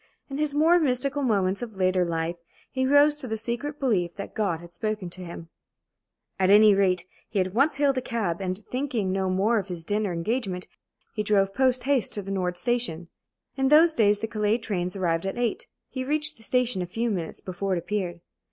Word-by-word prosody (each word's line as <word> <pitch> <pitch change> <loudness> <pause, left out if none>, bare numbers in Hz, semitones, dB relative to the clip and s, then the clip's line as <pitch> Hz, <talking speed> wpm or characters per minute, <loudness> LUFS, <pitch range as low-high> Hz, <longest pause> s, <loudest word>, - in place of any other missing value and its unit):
In 275 - -4
his 300 -1 0
more 330 +4 +5
mystical 275 -1 0
moments 200 -6 +1
of 230 -4 -6
later 185 -1 +2
life 170 0 -2 0.3
he 260 -1 0
rose 290 +2 +5
to 265 - -4
the 220 -1 -2
secret 240 +7 -4
belief 185 -10 0
that 200 - -7
God 195 -7 -1
had 170 0 -13
spoken 210 -1 -3
to 185 +1 -6
him. 170 -1 -9 0.9
At 190 -1 +3
any 210 +1 +7
rate, 185 -3 +2 0.2
he 205 - -1
at 185 0 -1
once 275 +7 +3
hailed 275 -2 +2
a - - -7
cab, 200 -9 -2
and, 185 +2 -3
thinking 250 -7 -1
no 190 0 0
more 205 +5 +2
of 195 - -6
his 175 -3 -5
dinner 205 +2 -1
engagement, 185 +1 -2 0.5
he 215 - -2
drove 195 -2 +2
post 255 0 +2
haste 270 -6 +2
to 205 - -4
the 195 - -6
Nord 180 -2 -1
Station. 180 -7 0 0.5
In 270 0 +1
those 315 +3 +6
days 210 -6 +3
the 225 - -1
Calais 215 0 +1
train 195 -6 -2
arrived 175 -1 0
at 195 - -4
eight. 240 -2 -1 0.2
He 260 -1 -3
reached 305 +3 0
the - - -19
station 250 -3 +1
a 180 - -3
few 225 +6 -1
minutes 170 -5 -4
before 190 +1 -3
it - - -1
appeared. 175 -1 -3
210 Hz, 205 wpm, -26 LUFS, 185-255 Hz, 0.9 s, any